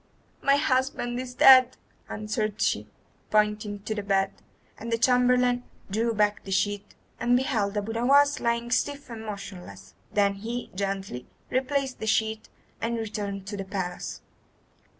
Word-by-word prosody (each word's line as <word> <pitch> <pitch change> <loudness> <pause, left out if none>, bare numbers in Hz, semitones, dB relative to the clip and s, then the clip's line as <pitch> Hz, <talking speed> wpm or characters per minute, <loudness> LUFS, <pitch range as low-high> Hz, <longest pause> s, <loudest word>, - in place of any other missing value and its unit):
"My 275 - +4
husband 260 -3 0
is 250 -1 -6
dead," 255 -1 +7 0.3
answered 215 0 -3
she, - - +1 0.4
pointing 210 -1 +1
to 215 - -2
the 210 - -3
bed; 195 -1 +1 0.5
and 230 +1 -6
the 230 - +2
chamberlain 250 0 +3 0.3
drew 225 +3 +1
back 210 0 +1
the - - -10
sheet 200 +1 -1 0.2
and 245 +1 +3
beheld 215 -6 0
Abu 205 +2 -2
Nowas 280 +5 +4
lying 235 0 -1
stiff 285 0 -1
and 225 -1 -7
motionless. 200 -4 -8 0.2
Then 200 -1 +3
he 235 +3 -4
gently 195 -9 -4 0.2
replaced 265 +1 -1
the 220 - -4
sheet 220 0 0 0.3
and 230 +1 -1
returned 205 -3 -4
to 205 +1 -5
the 195 - -3
palace. 190 -2 -5
220 Hz, 145 wpm, -27 LUFS, 205-250 Hz, 0.5 s, dead